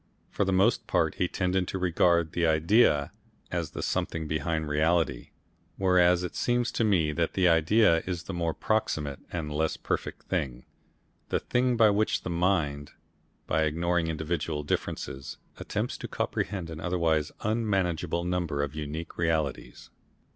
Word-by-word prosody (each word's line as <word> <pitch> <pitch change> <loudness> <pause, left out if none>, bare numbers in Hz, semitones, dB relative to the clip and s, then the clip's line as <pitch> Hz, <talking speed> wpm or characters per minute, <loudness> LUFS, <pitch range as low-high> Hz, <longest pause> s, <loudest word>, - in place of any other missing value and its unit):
For 100 - 0
the 95 - 0
most 100 +5 +2
part - - +1
he 90 - +2
tended 90 0 0
to - - -3
regard 85 -2 +2
the 85 -1 +1
idea 80 -1 +3 0.4
as - - -2
the - - -6
something 80 -1 -2
behind 80 0 -1
reality, 80 +2 +1 0.5
whereas 90 -1 +4
it 90 - -5
seems 120 0 +1
to - - 0
me 90 -8 +2
that 80 +2 -1
the 95 -2 +3
idea 85 +2 +4
is 90 -2 -3
the 95 - -6
more 85 -2 -1
proximate 80 -11 -1
and 80 -4 -4
less 80 +1 0
perfect - - -3
thing, 65 -1 -3 0.6
the - - +1
thing 125 0 +1
by 110 -2 +6
which 105 +2 +1
the - - -3
mind, 80 -5 0 0.5
by 80 - +1
ignoring 85 +2 +1
individual 80 -1 -2
differences, 70 -1 -4 0.2
attempts - - -3
to - - -5
comprehend 90 -4 -3
an 80 - -7
otherwise 80 -4 0
unmanageable 95 -7 0
number 85 -5 -1
of 70 0 -4
unique 75 +2 -6
realities. 80 -5 -2
85 Hz, 150 wpm, -28 LUFS, 80-95 Hz, 0.6 s, by